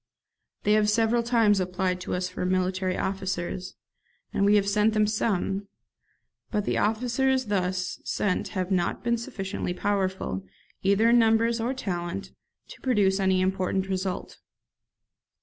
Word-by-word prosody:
They 210 - +3
have 215 -1 +3
several 225 +2 +3
times 230 -4 +3
applied 180 0 -1
to - - -3
us 180 0 -1
for 185 - -7
artillery 185 0 0
officers, 185 -1 -3 0.6
and - - +1
we 205 - +5
have 200 -1 +3
sent 210 +2 +2
them 215 0 +4
some; 200 -2 -1 0.8
but 210 -2 -1
the - - 0
officers 250 +4 +1
thus 185 -3 -1
sent 200 -3 -1
have 185 +1 -1
not 175 -2 0
been 235 -1 +1
sufficiently 195 -5 -4
powerful, 190 - -1 0.4
either 200 +4 +3
in 240 - +6
numbers 230 +1 +3
or 250 +4 -1
talent, 190 -4 -4 0.4
to - - -12
produce 205 -6 +2
any 190 -1 +2
important 190 0 0
result. 190 -1 -3
195 Hz, 140 wpm, -26 LUFS, 185-220 Hz, 0.8 s, in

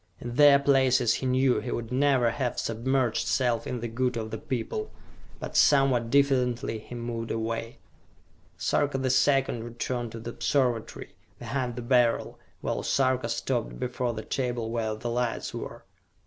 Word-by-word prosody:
In 120 0 -6
their 145 +1 +7
places 130 -4 +3
he 130 - -2
knew 130 0 +3
he 125 - -6
would 120 0 -4
never 130 -3 +3
have 125 0 -2
submerged 120 +1 0
self 125 -3 +1
in 125 -2 -4
the 120 - -2
good 125 +1 -1
of 110 -1 -4
the 110 - -4
people. 120 -7 -3 0.5
But, - - -7
somewhat 135 -5 +4
diffidently, 125 -4 +1
he 120 - -10
moved 115 -1 -4
away. 115 +1 -3 0.8
Sarka 145 -2 0
the 130 -1 0
Second 130 -2 +2
returned 120 0 -4
to 115 - -6
the 115 +1 -6
Observatory, 125 -4 -1 0.2
behind 125 -3 -3
the 120 - -5
Beryl, 120 -1 +2 0.2
while - - -2
Sarka 130 -1 +1
stopped - - -2
before 125 -1 -2
the 110 - -5
table 120 -4 -2
where 110 -2 -1
the 110 +2 -6
lights 120 -1 -2
were. - - -7
120 Hz, 160 wpm, -27 LUFS, 115-130 Hz, 0.8 s, their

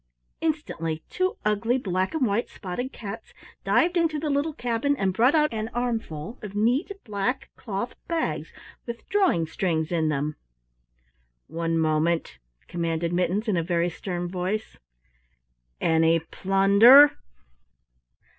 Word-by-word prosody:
Instantly 165 - -2
two 370 0 -1
ugly 220 +4 +1
black 185 - -1
and 290 -5 +2
white 215 +2 0
spotted 220 +8 -5
cats 220 +1 -8 0.3
dived 355 +1 +2
into 330 -3 +1
the 300 0 -2
little 285 +2 0
cabin 245 +3 0
and 190 -5 0
brought 245 - +4
out 300 -4 +3
an 220 0 -3
armful 225 - -3
of 205 -1 -8
neat, 245 - +1
black, 215 +4 -2
cloth 215 +1 -4
bags 335 -1 -2 0.4
with 235 0 -7
drawing 380 - +2
strings 160 -2 -1
in 160 -2 +1
them. 150 +1 -2 1.1
"One 165 0 -2
moment," 155 - 0 0.3
commanded 170 0 -2
Mittens 185 +5 0
in 200 -5 +1
a - - +2
very 170 0 0
stern 175 0 -4
voice, 185 +4 -3 1.0
"any 160 0 +3
plunder?" 200 - +6
200 Hz, 125 wpm, -25 LUFS, 170-250 Hz, 1.1 s, plunder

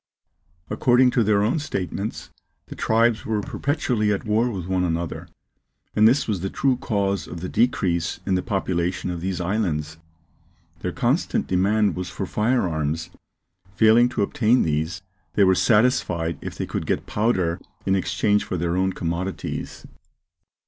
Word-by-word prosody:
According 125 0 +4
to 120 - +2
their 105 -1 +3
own 120 +9 +1
statements, 100 - -4 0.3
the - - -10
tribes 115 0 +2
were 110 -1 -1
perpetually 125 -4 -1
at 100 - -2
war 110 +3 +2
with 95 -7 -5
one 90 0 0
another, 85 -1 -3 0.7
and 110 +1 +6
this 130 +4 +3
was 100 -6 -1
the 95 - -2
true 135 +4 +1
cause 100 -5 -1
of 85 - -7
the 90 - -3
decrease 90 -7 0
in 95 - 0
the 90 - +2
population 90 -2 -1
of 85 -1 -5
these 95 0 -2
islands. 85 -5 -1 0.8
Their - - -3
constant - - 0
demand 100 +3 +2
was 90 0 -4
for 95 - -4
fire 110 +2 +1
arms; 80 +2 -2 0.6
failing 110 +3 +5
to 105 - -1
obtain 115 +4 +2
these, 80 +4 -2 0.3
they 100 - +5
were 95 -1 +5
satisfied 90 - +2
if - - -7
they - - -2
could - - -4
get - - -1
powder 95 -6 0 0.2
in 95 - +2
exchange 95 +3 +1
for 90 - -3
their 85 +1 -1
own 95 +1 +1
commodities. 85 0 -4
95 Hz, 155 wpm, -23 LUFS, 90-110 Hz, 0.8 s, and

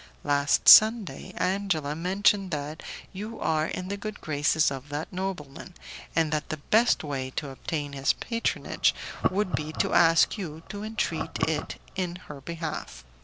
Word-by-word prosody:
Last 145 0 +2
Sunday, 220 -1 +7
Angela 180 -7 0
mentioned 195 +3 +2
that 150 -1 -4 0.3
you 215 +4 -6
are 155 0 +1
in 185 - -5
the 200 +1 -3
good 215 +1 -6
graces 155 0 +1
of 135 +1 -7
that 150 +5 -5
nobleman, 180 -3 -5 0.4
and 160 -2 +2
that 150 -1 -2
the 155 - -3
best 220 +10 +2
way 135 -3 -3
to 145 -3 -3
obtain 145 +1 -4
his 135 0 +2
patronage 230 -1 -1 0.3
would 190 0 -1
be 155 0 -2
to - - -1
ask 165 +5 +5
you 160 -4 -6
to 205 0 -6
entreat 220 +1 -2
it - - -3 0.2
in 180 -2 -2
her 150 -6 -10
behalf. 160 - -6
165 Hz, 155 wpm, -27 LUFS, 150-195 Hz, 0.4 s, Sunday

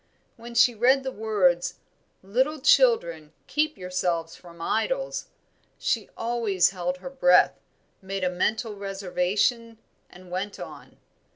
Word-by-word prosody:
When 235 +1 -11
she 245 0 +5
read 255 +5 +3
the 265 - -3
words, 180 -6 +1 0.5
"Little 260 +10 0
children, 170 - +3
keep 305 +1 0
yourselves 180 -3 -2
from 170 -1 -15
idols," - - -1 0.5
she - - -1
always 230 -6 +1
held 180 -1 -3
her 190 - -8
breath, 270 0 +4 0.4
made 195 0 -4
a 180 - +2
mental 215 +4 -1
reservation, 200 +4 -1 0.3
and 180 0 -15
went 195 +3 -4
on. - - -10
200 Hz, 120 wpm, -26 LUFS, 180-240 Hz, 0.5 s, she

